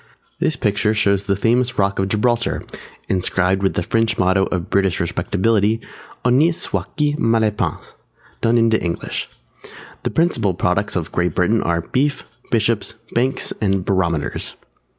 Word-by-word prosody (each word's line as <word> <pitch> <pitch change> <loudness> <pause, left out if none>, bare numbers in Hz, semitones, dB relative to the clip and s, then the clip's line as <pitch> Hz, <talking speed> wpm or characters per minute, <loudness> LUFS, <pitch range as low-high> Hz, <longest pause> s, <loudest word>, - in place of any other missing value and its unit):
This - - +1
picture 105 +1 +1
shows 100 -2 +2
the 100 0 +1
famous 120 +5 +1
Rock 100 -1 +1
of 95 - +1
Gibraltar, 115 +3 0 0.4
inscribed 95 0 +1
with 95 - +1
the 90 - 0
French 115 +4 +1
motto 95 +1 +3
of 90 -2 -4
British 95 -3 +2
respectability 105 +5 +1 0.5
(Honi 140 +7 +4
soit - - -4
qui 150 -1 +2
mal 115 0 +3
y 105 - +2
pense) 105 - -4 0.5
done 115 +1 +3
into 115 -1 +3
English. 85 -1 -3 0.7
The - - -1
principal 115 - +1
products 100 +4 0
of 85 -3 -2
Great 90 -3 0
Britain 105 +5 +2
are 85 0 0
Beef, 140 - -1 0.3
Bishops, 110 -1 +1 0.2
Banks, 130 +3 0
and 95 -3 +1
Barometers. 85 -6 -1
100 Hz, 150 wpm, -20 LUFS, 95-115 Hz, 0.7 s, Honi